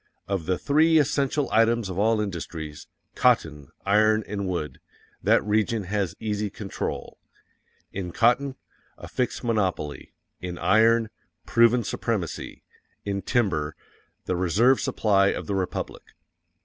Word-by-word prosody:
_ - - -46 0.2
Of 95 -5 -2
the 90 -1 +1
three 160 +3 +3
essential 140 -1 +1
items 115 0 +3
of 95 0 -4
all 110 +1 +3
industries 80 -6 -6 0.3
cotton, 75 -4 +2 0.2
iron 110 +2 +4
and 100 -2 -4
wood 85 -5 -3 0.4
that - - +3
region 110 +1 +1
has 95 -2 -2
easy 105 -1 -2
control. 100 0 -5 0.7
_IN 90 -3 -4
COTTON, 130 +7 +2 0.4
a - - -9
fixed 125 0 -2
monopoly 95 -10 -2 0.2
IN 90 -1 -6
IRON, 110 +3 +3 0.3
proven 115 +1 +4
supremacy 100 -4 -3 0.4
IN 100 -1 -2
TIMBER, 85 - 0 0.5
the 90 - -1
reserve 100 +9 +3
supply 100 -3 +2
of - - -1
the 100 - -3
Republic. 95 -2 -3
105 Hz, 125 wpm, -25 LUFS, 90-115 Hz, 0.7 s, iron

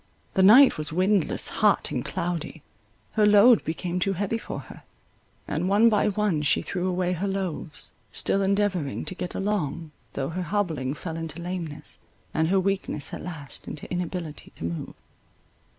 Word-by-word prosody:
The 190 - +3
night 220 - +8
was 155 +1 -1
windless, 185 +1 +1
hot, - - +3
and - - -2
cloudy; 170 -2 -4 0.5
her 215 - +2
load 210 +3 +7
became 175 +2 -3
too 195 +1 +1
heavy 200 +4 -1
for - - -6
her; - - -13 0.7
and 180 - -1
one 210 +4 +6
by 210 -1 +2
one 205 -6 +1
she 145 - +2
threw 180 -1 -2
away 180 0 0
her 185 +3 -2
loaves, 185 -5 -4 0.2
still 195 - +1
endeavouring 195 -7 0
to - - -4
get 180 -1 -5
along, 170 -6 -2 0.2
though 135 - -2
her 180 +3 -3
hobbling 160 -7 -1
fell 165 +1 -5
into 165 0 -5
lameness, 170 -4 -4 0.3
and 160 +1 +2
her 190 +3 +3
weakness 190 -6 -1
at - - -5
last 155 -6 -8
into 150 - -7
inability 175 -3 -4
to - - -9
move. 85 0 -4
180 Hz, 165 wpm, -26 LUFS, 160-195 Hz, 0.7 s, night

